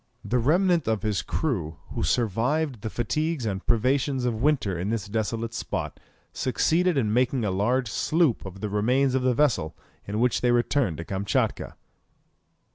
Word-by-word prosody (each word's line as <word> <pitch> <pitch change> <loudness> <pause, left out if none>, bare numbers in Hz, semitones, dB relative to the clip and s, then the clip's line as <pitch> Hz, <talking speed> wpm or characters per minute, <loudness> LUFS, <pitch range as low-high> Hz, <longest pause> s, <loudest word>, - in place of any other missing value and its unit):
The 125 - +1
remnant 170 +5 +2
of 110 -1 0
his 105 -3 0
crew 85 - -2
who - - -3
survived 120 - 0
the 110 - -3
fatigues 130 +6 -1
and 95 -2 -3
privations 130 +3 +1
of 115 -2 -1
winter 135 -10 +1
in 90 +4 -3
this 110 -3 -2
desolate 115 +2 -2
spot, - - -4 0.3
succeeded 165 +6 +1
in 110 -5 +1
making 125 0 +1
a 100 - 0
large 120 +7 +1
sloop 155 +4 +1
of 95 0 -9
the 105 - -2
remains 125 +6 +2
of 130 - +1
the 125 -1 +2
vessel, 115 - +1 0.3
in 105 +2 -2
which 125 +1 +2
they 125 - +2
returned 120 - +1
to 85 - -6
Kamtchatka. 95 +2 -1
120 Hz, 165 wpm, -26 LUFS, 105-135 Hz, 0.3 s, remnant